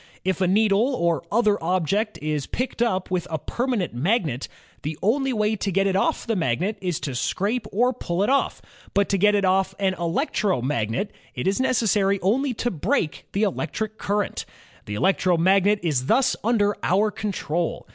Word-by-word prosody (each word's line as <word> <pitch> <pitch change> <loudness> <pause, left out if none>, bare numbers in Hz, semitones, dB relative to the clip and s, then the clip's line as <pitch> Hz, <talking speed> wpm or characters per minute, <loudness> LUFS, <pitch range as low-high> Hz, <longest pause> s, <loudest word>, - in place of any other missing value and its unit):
If 190 0 0
a 185 - +3
needle 215 +6 +3
or 170 - +1
other 210 -4 +2
object 185 +5 0
is 150 -2 -2
picked 255 -1 -3
up 190 -6 0
with 180 -2 -1
a 160 - -1
permanent 235 - -2
magnet, 150 - 0 0.3
the 150 +1 -4
only 270 +6 +2
way 215 -2 +1
to 200 - -2
get 195 +2 +2
it 195 -1 +1
off 195 - +1
the 230 - 0
magnet 180 - -1
is 180 -4 -2
to 140 - -3
scrape 210 - -1
or 245 +5 +2
pull 180 -5 -2
it 210 - +1
off; 275 - 0 0.3
but 200 0 +3
to 195 - +1
get 210 +2 +4
it 200 -1 +2
off 190 +1 +2
an 195 -2 +1
electromagnet, 165 - -1 0.2
it 125 - -3
is 195 +6 +1
necessary 210 -6 +2
only 255 +8 +2
to 240 +2 -1
break 180 - -1
the 200 - +1
electric 215 +2 -2
current. 205 0 -1 0.4
The 105 - -4
electromagnet 190 - +3
is 135 -6 0
thus 255 +3 +3
under 205 -3 +2
our 205 +4 +2
control. 175 -5 -3
195 Hz, 175 wpm, -24 LUFS, 170-215 Hz, 0.4 s, get